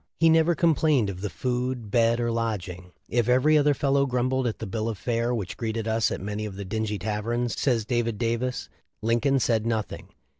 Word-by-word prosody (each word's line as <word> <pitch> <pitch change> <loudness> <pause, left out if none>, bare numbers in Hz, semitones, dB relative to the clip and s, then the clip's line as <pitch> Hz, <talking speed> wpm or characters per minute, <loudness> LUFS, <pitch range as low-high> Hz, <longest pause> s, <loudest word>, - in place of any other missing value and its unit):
"He 165 -1 +5
never 165 +1 +4
complained 155 - +2
of 95 -1 -9
the 105 - -2
food, 125 -3 -3
bed, 115 0 +3
or 120 -1 0
lodg 115 -5 -2
ings. 90 0 -10 0.2
If 120 0 0
every 130 +5 +4
other 145 -1 +4
fellow 140 0 +2
grumbled 130 0 0
at 115 - -3
the - - -6
bill 110 +3 -2
of 110 - -4
fare 120 +1 -1
which 105 -7 -3
greeted 115 -1 -3
us 110 -1 +2
at - - -3
many 105 +2 -4
of 100 -3 -6
the 100 0 -6
dingy 105 +1 -2
tav 105 +3 -3
erns," 120 0 -1
says 120 -6 +1
David 115 -2 -1
Davis, 120 +2 -2 0.4
"Lincoln 120 +5 +2
said 115 -2 +1
nothing." 110 -2 -3
115 Hz, 210 wpm, -26 LUFS, 110-130 Hz, 0.4 s, He